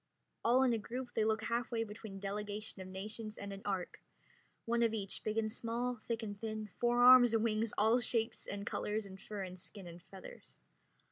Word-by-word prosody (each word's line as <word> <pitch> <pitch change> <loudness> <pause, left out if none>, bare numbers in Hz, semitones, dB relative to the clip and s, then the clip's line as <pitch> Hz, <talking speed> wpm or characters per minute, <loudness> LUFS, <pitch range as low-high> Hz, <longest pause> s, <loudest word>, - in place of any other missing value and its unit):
All 250 +3 +5
in 250 -2 +4
a 225 - 0
group 245 +3 -6
they 220 - +2
look 220 0 +1
half 235 +1 -1
way 230 -2 0
between 210 -1 -8
a - - -7
delegation 205 +1 -4
of 185 - -7
nations 215 +3 -6
and 200 0 -6
an 195 - -8
ark, 190 -3 -3 0.6
one 235 +1 +1
of 230 -1 +3
each, 195 -3 -3
big 215 +1 -2
and 215 -1 0
small, 240 +1 -2
thick 230 -1 -1
and 205 -2 -6
thin, 215 -2 -4
four 240 0 +3
arms 245 -2 +9
or - - +4
wings, 220 0 +1
all 220 +4 +5
shapes 230 -1 +1
and 200 0 -4
colors 210 0 -2
in 190 -1 -9
fur 200 0 -6
and 185 0 -8
skin 195 +1 -9
and 175 0 -10
feathers. 190 0 -12
215 Hz, 210 wpm, -35 LUFS, 200-230 Hz, 0.6 s, arms